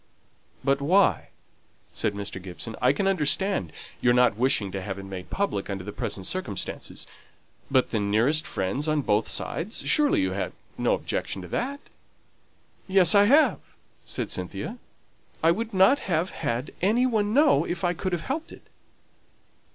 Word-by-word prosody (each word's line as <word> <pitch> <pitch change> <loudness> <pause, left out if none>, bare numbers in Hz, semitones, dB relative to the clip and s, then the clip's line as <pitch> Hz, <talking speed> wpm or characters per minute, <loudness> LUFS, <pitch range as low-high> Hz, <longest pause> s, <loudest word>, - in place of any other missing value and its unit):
"But 140 +1 +1
why?" 185 +7 +3 0.7
said 105 -2 -1
Mr. 100 -2 -6
Gibson. 95 +5 -6
"I 125 - +5
can 190 +8 -1
understand 190 - +1 0.3
your 120 0 +4
not 125 -4 +4
wishing 120 -4 +1
to 95 0 -4
have 95 0 -5
it 100 - -7
made 95 -1 -8
public 190 - -2
under 95 -2 -4
the 105 - -6
present 95 -2 -4
circumstances. 110 - -4 0.6
But 130 -2 +2
the 110 - 0
nearest 115 +10 +2
friends 100 +11 -2
on 155 -1 +1
both 105 -1 +1
sides! 200 +8 -2
Surely 300 +2 +3
you 285 - +1
can - - -4
have - - -3 0.2
no - - +1
objection - - -4
to - - -8
that?" 280 +3 -3 1.1
"Yes, 185 -3 +6
I 200 0 +6
have," 290 +8 +4 0.4
said - - -4
Cynthia; - - -5 0.6
"I 165 - +6
would 225 +6 -2
not 195 +9 +5
have 170 0 -1
had 120 +4 -3
any 220 +7 +3
one 215 -4 +1
know 290 +4 +4
if 175 0 -4
I 175 0 +2
could 185 +2 -3
have 175 -2 -2
helped 310 +5 -4
it." - - -13
155 Hz, 165 wpm, -26 LUFS, -, 1.1 s, Yes